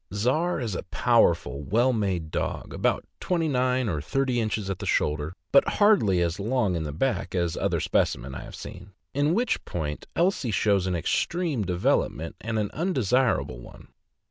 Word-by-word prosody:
Czar 130 - +1
is 115 -6 -3
a - - -3
powerful, 70 - +2
well 120 - +2
made 95 -8 -1
dog, - - -3
about - - 0
twenty 170 -3 0
nine 130 -2 +1
or 80 -7 -1
thirty 130 - 0
inches 110 -2 -2
at 95 -1 -3
the 100 - -5
shoulder, 75 +2 0 0.2
but 140 - +5
hardly 195 - +4
as 85 +2 -1
long 110 -2 +1
in 80 -3 -3
back 135 -2 -1
as 85 -2 0
other - - 0
specimens 65 +3 0
I - - -6
have - - -9
seen; 95 +2 -10 0.2
in 145 +4 +2
which 240 +2 0
point 75 -3 -4
Elsie 170 -7 +1
shows 100 -2 +2
an 90 - 0
extreme 155 - 0
development, 85 -3 0
and 110 0 -2
an 105 -2 -1
undesir 130 - +2
able 65 - -8
one. - - -13
105 Hz, 170 wpm, -26 LUFS, 85-135 Hz, 0.2 s, but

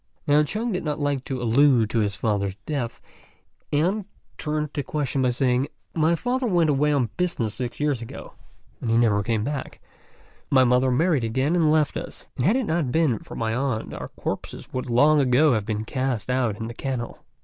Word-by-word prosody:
Now 145 +1 +5
Chung 215 +10 -2
did 185 -1 -2
not 150 -2 -2
like 145 -2 -1
to 130 -2 -3
allude 120 -1 +4
to 115 - +1
his 100 -2 0
father's 100 -4 -1
death, 130 -6 -3 0.7
and 180 +8 +1 0.3
turned 150 -1 -2
the 145 - -1
question 140 -2 -2
by 130 - +3
saying, 125 +1 +1 0.3
"My 160 +1 +3
father 250 +6 -1
went 170 -6 +3
away 150 +2 +2
on 135 -6 +1
business 145 -12 -1
six 120 +1 -5
years 145 -5 0
ago, 115 - -9 0.5
and 115 -1 +2
never 105 -4 +3
came 110 0 0
back; 140 +2 -4 0.7
my 130 -1 +5
mother 125 +1 +3
married 150 +1 +2
again 130 +8 0
and 160 -3 +3
left 155 -3 +2
us, - - -8
and 125 - +1
had 210 - +4
it 260 -2 +1
not 160 -8 0
been 150 -7 +2
for - - -11
my 110 -1 -1
aunt 125 -3 -2
our - - -6
corpses - - -5
would 130 -1 -3
long 145 +5 +5
ago 135 +3 +4
have 110 -3 -1
been 110 0 -2
cast 130 -1 -2
out 125 -5 0
in 115 - -5
the 115 - -6
kennel." 125 -1 -4
135 Hz, 195 wpm, -24 LUFS, 120-150 Hz, 0.7 s, Now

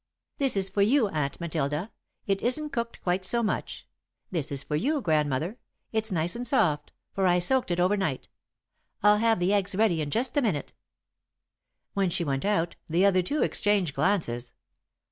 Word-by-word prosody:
"This 270 -7 +3
is 190 -1 +2
for 200 +1 -1
you, 225 +1 +3
Aunt 150 -5 -2
Matilda 155 +2 -2 0.3
it 195 -2 0
isn't 300 +5 0
cooked 235 -1 -3
quite 180 +1 0
so 235 +5 +1
much. 215 - -3 0.4
This 160 -7 -2
is 135 -1 0
for 150 - -3
you, 285 - +1
Grandmother. 155 - 0 0.3
It's 220 -1 -1
nice 170 +1 0
and 245 +1 -2
soft, 150 - +1 0.2
for 195 -1 +1
I 175 0 +4
soaked 250 +8 +2
it 175 0 0
over 185 +3 +3
night. 190 -10 -2 0.8
I'll 210 0 +5
have 225 0 +3
the 180 +3 +2
eggs 200 -1 +1
ready 195 -6 +2
in 145 - -3
just 240 - -1
a - - +5
minute." 185 - -1 1.2
When 195 -2 +1
she 170 - -1
went 135 -1 -2
out, 190 -5 0
the 170 +4 +2
other 185 -2 +4
two 285 +12 0
exchanged 200 -7 +1
glances. 135 -8 -1
190 Hz, 180 wpm, -27 LUFS, 160-220 Hz, 1.2 s, I'll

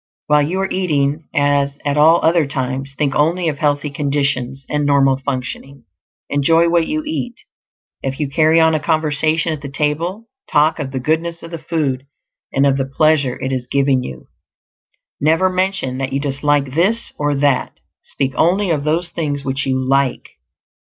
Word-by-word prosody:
While 150 0 +4
you 170 +6 -1
are 195 - -2
eating, 150 -4 0
as 145 -2 +1
at 145 -1 0
all 160 +3 +5
other 165 -2 +3
times, 135 0 -3
think 145 -3 0
only 165 +4 +1
of 145 -2 -5
healthy 145 -1 0
conditions 140 -3 -1
and 150 0 -1
normal 140 -2 +3
functioning. 135 0 -5 0.4
Enjoy 165 +4 +3
what 170 -1 +2
you 310 0 -2
eat; 300 -6 -3 0.7
if 135 +1 -4
you 150 - 0
carry 160 +3 +3
on 160 0 +4
a 155 - +1
conversation 155 +2 0
at 150 - -7
the 140 - -6
table, 160 +10 -2 0.2
talk 150 +3 +3
of 140 -3 -3
the 135 -1 -4
goodness 165 +5 -1
of 165 - -9
the 165 - -5
food, 145 -5 -2 0.4
and 135 - +2
of 135 -1 +3
the 135 - 0
pleasure 145 -3 +2
it 130 - -2
is 125 -1 -3
giving 135 -2 +2
you. 65 - -8 0.9
Never 165 +5 +2
mention 185 -8 -1
that 135 0 -2
you 135 - 0
dislike 140 -1 0
this 200 +9 +1
or 145 -1 +1
that; 140 -2 0 0.2
speak 135 -1 -3
only 185 +3 +2
of 150 -3 0
those 165 +4 0
things 145 -4 -3
which 135 +1 -2
you 130 0 +1
like. 135 0 0
145 Hz, 175 wpm, -18 LUFS, 135-165 Hz, 0.9 s, all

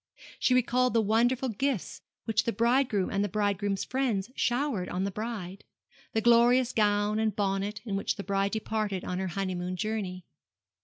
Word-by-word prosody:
She 255 - +3
recalled 250 0 +2
the - - +5
wonderful 240 +5 +2
gifts 245 -1 -2 0.2
which 225 0 +1
the 230 - +1
bridegroom 235 -4 +1
and 200 0 +1
the 205 - -1
bridegroom's 205 0 0
friends 245 -5 -1
showered 245 -7 0
on 180 +1 -2
the 200 - -1
bride 205 -3 -5 0.5
the 220 - +1
glorious 240 +2 +4
gown 210 0 +2
and 220 -2 0
bonnet 200 +1 -1
in 205 -4 -2
which 195 - -1
the 200 - -6
bride 195 0 0
departed 215 -3 -2
on 180 0 -3
her 190 - -2
honeymoon 185 -1 -3
journey. 185 -2 -3
210 Hz, 165 wpm, -29 LUFS, 195-235 Hz, 0.5 s, the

